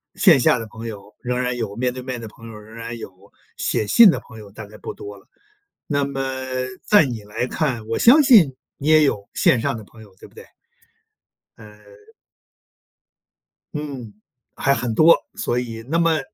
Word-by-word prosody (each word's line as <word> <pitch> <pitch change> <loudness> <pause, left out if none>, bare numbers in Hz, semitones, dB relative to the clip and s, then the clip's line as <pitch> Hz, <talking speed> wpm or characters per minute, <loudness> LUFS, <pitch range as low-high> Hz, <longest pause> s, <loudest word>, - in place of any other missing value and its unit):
线 170 -9 +5
下 120 - +3
的 115 - -7
朋 110 +2 -9
友 105 -2 -10
仍 125 0 -2
然 125 0 -2
有 110 -4 -4
面 125 +2 -1
对 130 - -7
面 125 -1 -5
的 115 - -7
朋 115 +2 -14
友， - - -10
仍 105 +1 -15
然 115 +1 -7
有， 100 -2 -12 0.3
写 110 - -1
信 220 - +8
的 - - -3
朋 110 -2 -14
友 105 -2 -13
大 105 +1 -10
概 105 +1 -14
不 - - -7
多 100 0 -10
了。 95 - -21 0.6
那 145 -2 0
么 135 -1 -4 0.4
在 205 -7 +5
你 120 -5 -5
来 105 +4 -4
看， 125 -6 -2
我 115 - -2
相 270 +6 +7
信 195 - +6 0.2
你 140 - -5
也 155 0 +6
有 100 -8 -1
线 125 - +3
上 115 - -1
的 110 - -10
朋 110 +2 -17
友， 100 -3 -18
对 - - -14
不 - - -26
对？ 460 - -12 1.1
呃 - - -14 2.0
嗯， 140 -8 -6 0.4
还 140 - +2
很 120 -2 -2
多。 160 +8 +6 0.2
所 120 - -1
以， 115 -2 -6
那 165 +4 0
么 165 -1 +2
120 Hz, 205 characters per minute, -21 LUFS, 110-140 Hz, 2.0 s, 信